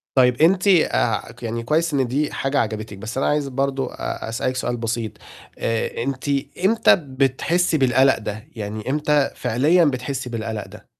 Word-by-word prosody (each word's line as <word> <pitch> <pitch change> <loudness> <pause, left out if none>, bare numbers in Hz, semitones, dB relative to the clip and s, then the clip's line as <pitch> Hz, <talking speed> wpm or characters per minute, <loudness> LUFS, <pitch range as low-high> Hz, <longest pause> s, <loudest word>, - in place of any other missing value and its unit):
طيب. 125 -1 +4
أنتِ 185 +4 +4
آآ، 180 -5 +2
ك - - -16
يعني 115 0 -3
كويس 155 +5 +1
إن 135 -3 +1
دي 145 +4 -1
حاجة 135 +1 0
عجبتِك، 110 -2 -3
بس 110 +5 -6
أنا 135 - +1
عايز 150 -1 +1
برضه 135 0 -2
أ - - -5
أسألِك 115 +3 -2
سؤال 125 -1 -2
بسيط، 115 -2 -2 0.5
آآ، 115 0 -1
أنتِ 135 +2 -3 0.4
إمتى 225 +3 +5
بتحسّي 145 +4 0
بالقلق 130 0 +4
ده؟ 105 -1 -6
يعني 110 +1 -5
إمتى 150 0 +2
فعليًا 145 +9 +3
بتحسّي 130 -1 -2
بالقلق 110 -2 -4
ده؟ - - -14
130 Hz, 165 wpm, -22 LUFS, 115-145 Hz, 0.5 s, إمتى